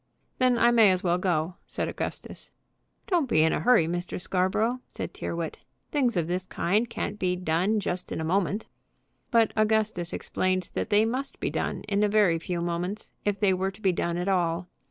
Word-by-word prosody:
"Then 255 -1 +4
I 235 +1 +5
may 225 -4 +6
as 185 -1 +1
well 175 -1 +2
go," 175 -1 0
said - - -2
Augustus. - - -6 0.6
"Don't 340 -9 +1
be 155 -8 +4
in 160 - +3
a - - 0
hurry, 245 -8 +4
Mr. 175 +2 -3
Scarborough," 195 +7 0
said - - -6
Tyrrwhit. 170 -1 -4 0.3
"Things 250 -8 +1
of 170 - +1
this 180 +2 -3
kind 210 +8 0
can't 210 -2 -4
be 180 -1 +1
done 180 +5 +1
just 180 -2 -3
in - - -3
a 160 - -2
moment." 195 +4 0 0.6
But 230 -3 +3
Augustus 215 -5 +1
explained 185 -1 -1
that - - -2
they 210 +1 +4
must 255 +5 -3
be - - -1
done - - -2
in 205 -1 0
a 210 - +3
very 200 -6 +3
few 175 +1 -3
moments, 175 +4 -3
if 205 -1 0
they 195 -2 +3
were 190 +1 0
to 195 +2 -13
be 195 -3 +2
done 170 -1 -1
at 180 +2 -2
all. 175 -2 +1
190 Hz, 195 wpm, -27 LUFS, 175-215 Hz, 0.6 s, may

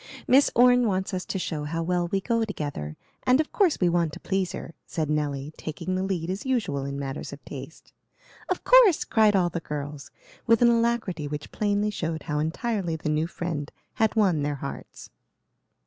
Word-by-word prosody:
Miss 270 +3 +6
Orne 245 0 +6
wants 190 -2 -1
us 185 0 -2
to - - -2
show 155 -5 -3
how 165 +2 -2
well 175 0 0
we 195 +2 -1
go 230 +3 +1
together, 145 - -4 0.2
and 255 +2 +3
of 310 - 0
course 375 -7 +3
we 180 - +3
want 170 -3 +1
to - - -8
please 190 -2 -1
her;" 165 - -7
said 155 -2 -2
Nelly 145 -1 -2
taking 160 +4 -4
the 185 - 0
lead 185 -4 -2
as 190 - -4
usual 205 - -1
in 140 0 -4
matters 140 0 -5
of - - -11
taste. - - -10 0.6
"Of - - -1
course!" - - +6
cried 215 -3 +4
all 175 -2 +2
the 170 - -2
girls, 145 -2 -6 0.4
with 230 0 +5
an 240 - +7
alacrity 230 -9 +1
which 150 0 -6
plainly 205 0 0
showed 165 -5 -3
how 150 -2 -2
entirely 175 +2 -1
the 155 -1 -3
new 155 +2 +1
friend 160 -4 -4 0.2
had 220 0 +1
won 190 -8 +3
their 145 0 -1
hearts. 140 0 -8
175 Hz, 195 wpm, -26 LUFS, 150-220 Hz, 0.6 s, an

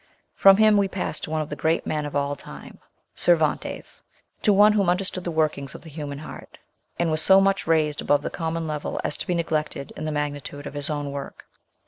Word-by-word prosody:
From 195 0 +6
him 215 -1 +5
we 200 -1 +3
pass 185 -5 -3
to - - -5
one 155 0 -1
of 155 - -5
the - - -4
great 160 +1 0
men 150 -1 -2
of 145 - -8
all 145 0 0
time, - - -12 0.3
Cervantes, 160 -4 0 0.4
to 210 - +4
one 205 +2 +6
who 205 -2 +2
under 180 +2 +1
stood 185 -1 -3
the 175 - -3
workings 155 -4 -1
of - - -10
the 160 - -11
human 145 -2 -6
heart, 155 - -10 0.4
and 170 -2 0
was 155 0 +4
so 190 +4 +7
much 195 -2 +1
raised 155 -2 +1
above 145 - +2
the - - -3
common 165 0 -3
level 150 -1 -4
as - - -2
to - - -5
be 180 - 0
neglected 155 -4 -2
in 155 - -5
the 155 - -2
magnitude 145 -1 -4
of - - -7
his 145 +1 -3
own 145 -2 -3
work. 140 0 -8
155 Hz, 225 wpm, -24 LUFS, 145-180 Hz, 0.4 s, so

